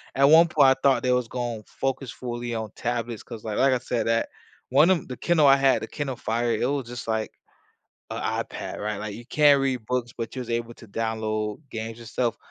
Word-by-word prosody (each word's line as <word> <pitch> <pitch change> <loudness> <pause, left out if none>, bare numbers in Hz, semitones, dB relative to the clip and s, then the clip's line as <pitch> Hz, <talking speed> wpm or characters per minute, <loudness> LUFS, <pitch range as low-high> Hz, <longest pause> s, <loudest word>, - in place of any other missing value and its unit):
at 135 - +2
one 165 +2 +8
point 145 -4 +5
I 130 - +5
thought 135 -1 +3
they 125 - +2
was 125 -1 +1
gonna 120 -3 -4
focus 135 -1 -3
fully 120 -1 -5
on 110 -2 -4
tablets 120 -2 -3
'cause, 115 -3 -9
like 110 -2 -3
like 135 0 +4
I 125 - +1
said, 120 -2 -2
that 115 0 +1 0.4
one 165 - +5
of 185 -6 +2
the 125 - -6
Kindle 165 -4 +3
I 135 0 +7
had- 135 -1 +3
the - - -4
Kindle 140 -4 -4
Fire- 115 +1 -1
it - - 0
was 135 -2 -1
just 120 -1 -7
like 110 -1 -1 0.8
a - - -4 0.3
iPad, - - -7
right, 105 -1 -2
like, 105 -1 -5
you 120 +2 -10
can't 145 -1 +5
read 130 -4 -1
books, 125 -1 -2
but 115 +2 -5
you - - -3
was 120 - -6
able 115 0 -2
to 115 - -14
download 110 +1 -2
games 115 0 -5
and 115 -1 -10
stuff, 120 0 -1
120 Hz, 230 wpm, -25 LUFS, 115-135 Hz, 0.8 s, one